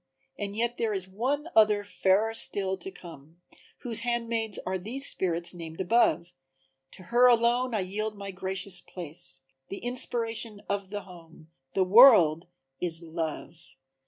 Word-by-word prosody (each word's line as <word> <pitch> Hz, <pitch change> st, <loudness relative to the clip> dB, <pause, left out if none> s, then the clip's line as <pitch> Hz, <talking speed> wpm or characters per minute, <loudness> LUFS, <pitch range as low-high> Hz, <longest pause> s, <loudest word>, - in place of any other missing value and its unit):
And 200 Hz, 0 st, -4 dB
yet 235 Hz, +2 st, -1 dB
there 220 Hz, -3 st, -1 dB
is 190 Hz, -1 st, -4 dB
one 260 Hz, -, -2 dB
other 210 Hz, -2 st, +5 dB
fairer 205 Hz, +2 st, +1 dB
still 195 Hz, -3 st, 0 dB
to 385 Hz, -, -8 dB
come 165 Hz, -, -14 dB, 0.4 s
Whose 235 Hz, -3 st, 0 dB
handmaids 230 Hz, -2 st, -2 dB
are 185 Hz, 0 st, -2 dB
these 245 Hz, +9 st, -4 dB
spirits 175 Hz, -6 st, 0 dB
named 165 Hz, -2 st, -9 dB
above; 175 Hz, -4 st, +2 dB, 0.6 s
To 185 Hz, -, -10 dB
her 240 Hz, +6 st, +4 dB
alone 240 Hz, +1 st, +3 dB
I 210 Hz, -, 0 dB
yield 210 Hz, +3 st, -4 dB
my 200 Hz, 0 st, -6 dB
gracious 190 Hz, 0 st, -5 dB
place, 145 Hz, -6 st, -9 dB, 0.3 s
The 195 Hz, -, -5 dB
inspiration 230 Hz, -3 st, -2 dB
of 200 Hz, -1 st, -3 dB
the 205 Hz, 0 st, -5 dB
home 165 Hz, -3 st, -15 dB, 0.2 s
the 190 Hz, -, +3 dB
world 185 Hz, -, +7 dB, 0.3 s
is 170 Hz, -1 st, -1 dB
Love!" 165 Hz, 0 st, -5 dB
200 Hz, 145 wpm, -28 LUFS, 175-230 Hz, 0.6 s, world